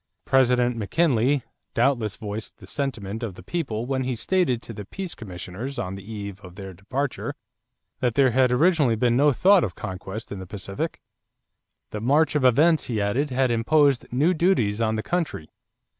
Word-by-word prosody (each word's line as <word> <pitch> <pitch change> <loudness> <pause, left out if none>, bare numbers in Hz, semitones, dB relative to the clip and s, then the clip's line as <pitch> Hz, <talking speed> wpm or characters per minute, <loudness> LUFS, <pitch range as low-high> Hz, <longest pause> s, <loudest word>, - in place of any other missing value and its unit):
President 125 -2 +3
McKinley 130 - +2 0.3
doubtless 115 -7 +1
voiced 105 -1 -6
the - - -13
sentiment 115 -7 -4
of 110 -6 -4
the 90 - -12
people 120 - -3
when 130 0 -1
he 130 -1 -2
stated 145 -1 +1
to 115 - -8
the 105 -1 -7
peace 185 - -6
commissioners 95 +6 -7
on 90 - -3
the 95 0 -8
eve 100 -2 -6
of 90 -2 -12
their 95 -1 -8
departure 130 +9 -3 0.6
that 120 -3 0
there 135 -2 +4
had 130 +1 +3
originally 145 -3 +3
been 120 +1 +2
no 145 +3 +5
thought 190 - +5
of 90 -7 -3
conquest 95 +3 -6
in 100 - -5
the 95 - -8
Pacific. 100 0 -4 0.9
The 105 - -4
march 145 +7 +3
of 150 -3 +1
events, 150 +6 +4
he 115 -4 -2
added, 120 +9 0
had 130 -1 +1
imposed 140 +3 +2
new 145 +9 +3
duties 135 - +2
on 110 -1 +1
the 110 - -2
country. 165 - -2
120 Hz, 175 wpm, -24 LUFS, 105-140 Hz, 0.9 s, no